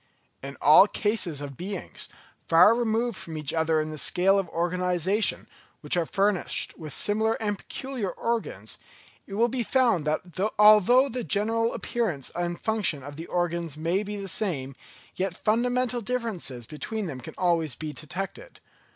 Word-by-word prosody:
In 140 +1 -8
all 155 +7 +8
cases 205 -9 -1
of 140 -1 -7
beings, 185 +4 -6 0.4
far 170 +7 +7
removed 230 -1 0
from 160 -3 -6
each 150 -2 -2
other 160 -1 +1
in 155 0 -2
the 155 - -3
scale 195 +5 +3
of 185 -4 -3
organisation, 180 +4 +1 0.3
which - - +1
are 170 -2 0
furnished 200 -2 0
with 155 -2 -9
similar 220 +6 +2
and 205 -2 -3
peculiar 260 -7 -5
organs, 230 +4 -4 0.5
it 195 - -7
will 230 +3 +3
be 245 +1 -2
found 235 - +2
that 155 0 0 0.4
although 215 +5 +6
the 250 -2 -4
general 225 +3 +1
appearance 185 - -2
and 175 0 -3
function 210 -11 0
of 145 +1 -9
the 165 +3 -8
organs 170 -3 -2
may 170 +5 0
be 210 0 -5
the 200 -1 -6
same, 150 -9 -2 0.4
yet 185 -1 -2
fundamental 245 +2 0
differences 200 - -3
between 175 - -5
them 135 -7 -6
can - - -10
always 165 -7 +1
be 155 +1 -6
detected. 195 - -7
190 Hz, 160 wpm, -26 LUFS, 160-220 Hz, 0.5 s, all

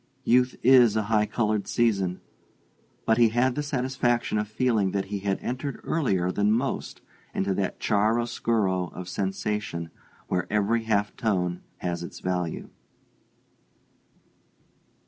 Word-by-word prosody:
Youth 125 +1 +3
is 125 -4 +6
a 110 - +1
high 105 -1 +3
colored 110 -3 0
season; 100 -6 +1 0.8
but 110 +1 +3
he 115 -1 +6
had 120 +3 +2
the 150 - -2
satisfaction 125 -5 0
of 105 - -2
feeling 110 -3 +1
that 100 -1 0
he 100 - -1
had 100 0 -1
entered 130 +2 -4
earlier 95 - 0
than 105 +2 +2
most 125 +5 -2 0.3
into 95 0 0
that 95 0 -2
chiar'oscuro 110 -4 +1
of 90 -1 -7
sensation 95 -3 -3 0.4
where 90 -1 -1
every 110 +2 +1
half 105 -2 0
tone 90 -5 -1 0.2
has 85 -1 -2
its 85 - -8
value. 90 -3 -3
105 Hz, 125 wpm, -26 LUFS, 95-120 Hz, 0.8 s, is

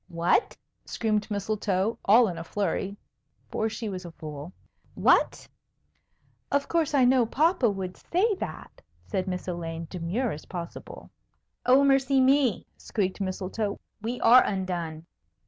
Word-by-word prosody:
"What!" 170 - +1 0.3
screamed 215 -2 -1
Mistletoe, 205 0 -1
all 225 +4 +6
in 175 -4 -4
a - - -5
flurry 200 +2 -2 0.5
(for 220 - 0
she 225 +1 -5
was 185 -2 -5
a 175 - -8
fool). 150 0 -8 0.4
"What?" - - +3 1.0
"Of 285 0 +1
course, 320 -4 +1
I 260 -3 +5
know 250 -2 +4
papa 300 -2 +2
would 190 -2 -4
say 415 +6 +1
that," - - -7 0.2
said 190 -3 -2
Miss 180 0 -4
Elaine, 165 -2 -4
demure 185 +8 -2
as 150 - -7
possible. 170 -2 -8 0.6
"Oh, 260 +2 +6
mercy 270 0 +3
me!" 260 -5 +3
squeaked 195 -2 -2
Mistletoe; 195 +2 -3 0.2
"we 235 +3 -3
are 245 +3 +8
undone!" 175 -5 -3
205 Hz, 135 wpm, -27 LUFS, 180-250 Hz, 1.0 s, are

